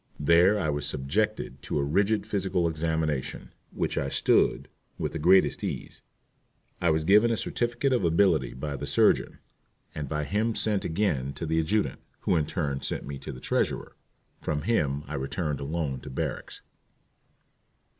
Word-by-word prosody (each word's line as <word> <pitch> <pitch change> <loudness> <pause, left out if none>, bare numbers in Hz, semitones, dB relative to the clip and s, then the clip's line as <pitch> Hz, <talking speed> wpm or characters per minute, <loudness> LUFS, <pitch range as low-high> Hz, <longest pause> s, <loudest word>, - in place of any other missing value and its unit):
There 85 +7 +5
I 90 - -1
was 75 -1 0
subjected 75 +11 -1
to - - -3
a 70 - +1
rigid 100 +9 +1
physical 95 -3 0
examination, 80 -3 -2 0.2
which - - -2
I 70 - -2
"stood" - - +2 0.3
with - - -2
the - - -4
greatest 95 +5 +4
ease. - - -5 0.8
I 85 - +3
was 80 0 +2
given 105 +7 +5
a 115 - +1
certificate 120 +5 0
of 120 - +1
ability 85 -7 +2
by 70 +2 -4
the 70 - -5
surgeon, 70 - +3 0.6
and 75 -3 -5
by 75 -1 -1
him 110 +8 0
sent 105 -3 +2
again 80 -7 -1
to 75 +4 -5
the 80 +1 +1
adjutant, 100 +7 0 0.2
who - - +1
in 75 -3 +1
turn 70 -6 -2
sent - - -3
me 70 -1 -6
to - - -7
the 65 - -9
treasurer. - - -1 0.5
From 75 -1 -2
him 75 -9 0
I 75 - -8
returned 75 +2 -2
alone 70 -2 -3
to - - -10
barracks. 65 - -4
80 Hz, 165 wpm, -27 LUFS, 70-95 Hz, 0.8 s, There